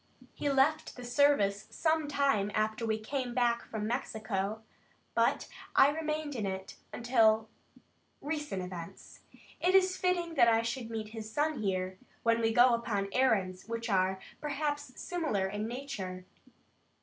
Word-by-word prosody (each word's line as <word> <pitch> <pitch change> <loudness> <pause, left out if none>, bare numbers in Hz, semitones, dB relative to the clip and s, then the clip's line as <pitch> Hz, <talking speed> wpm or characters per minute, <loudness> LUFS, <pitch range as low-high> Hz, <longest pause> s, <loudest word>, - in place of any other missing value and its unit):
He 290 - -2
left 275 +3 +2
the 250 - -9
service 245 -6 +2
some 315 -2 +1
time 275 -8 +2
after 215 +1 0
we 220 0 +1
came 245 +2 -3
back 240 -1 +2
from 215 -2 -4
Mexico, 220 -3 -2 0.5
but - - +2 0.3
I 270 - +7
remained 305 -1 -3
in 215 -4 -2
it, 190 0 -5 0.2
until 225 -3 +3 0.7
recent 295 -10 -3
events. 175 -2 -9 0.4
It 365 +2 +3
is 375 -1 +4
fitting 350 -2 0
that 245 -6 +5
I 225 0 +4
should 230 0 -3
meet 220 -2 -4
his 220 -1 -7
son 295 -1 0
here, 185 -2 -2 0.2
when 230 0 +3
we 225 0 +2
go 245 +2 +6
upon 210 -4 -1
errands 200 -9 +1
which 230 -1 -3
are, 190 0 +2 0.2
perhaps, 290 -2 -3
similar 310 - -1
in 205 +2 -3
nature. 200 -8 -5
230 Hz, 145 wpm, -31 LUFS, 210-285 Hz, 0.7 s, I